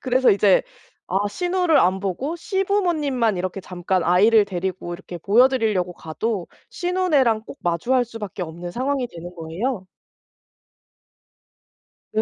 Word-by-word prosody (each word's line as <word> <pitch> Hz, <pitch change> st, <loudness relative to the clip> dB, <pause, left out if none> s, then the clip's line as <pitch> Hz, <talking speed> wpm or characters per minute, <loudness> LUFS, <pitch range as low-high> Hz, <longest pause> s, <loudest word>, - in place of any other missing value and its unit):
그래서 255 Hz, 0 st, +3 dB
이제 200 Hz, -1 st, +4 dB, 0.5 s
아 200 Hz, +3 st, 0 dB
시누를 355 Hz, -, +1 dB
안 185 Hz, +2 st, +3 dB
보고 225 Hz, -, -3 dB
시부모님만 335 Hz, -, 0 dB
이렇게 185 Hz, +2 st, -3 dB
잠깐 180 Hz, 0 st, -2 dB
아이를 205 Hz, +5 st, +5 dB
데리고 185 Hz, -2 st, -4 dB
이렇게 175 Hz, -1 st, -9 dB
보여 220 Hz, +9 st, +5 dB
드리려고 215 Hz, -9 st, 0 dB
가도 180 Hz, +4 st, -3 dB, 0.2 s
시누네랑 315 Hz, -12 st, +1 dB
꼭 275 Hz, -, -11 dB
마주할 235 Hz, +10 st, +1 dB
수밖에 215 Hz, -5 st, -7 dB
없는 175 Hz, +1 st, -6 dB
상황이 260 Hz, +3 st, -1 dB
되는 175 Hz, -1 st, -10 dB
거예요. 185 Hz, +6 st, -3 dB, 2.3 s
네. 220 Hz, -, +1 dB
210 Hz, 300 characters per minute, -22 LUFS, 180-260 Hz, 2.3 s, 아이를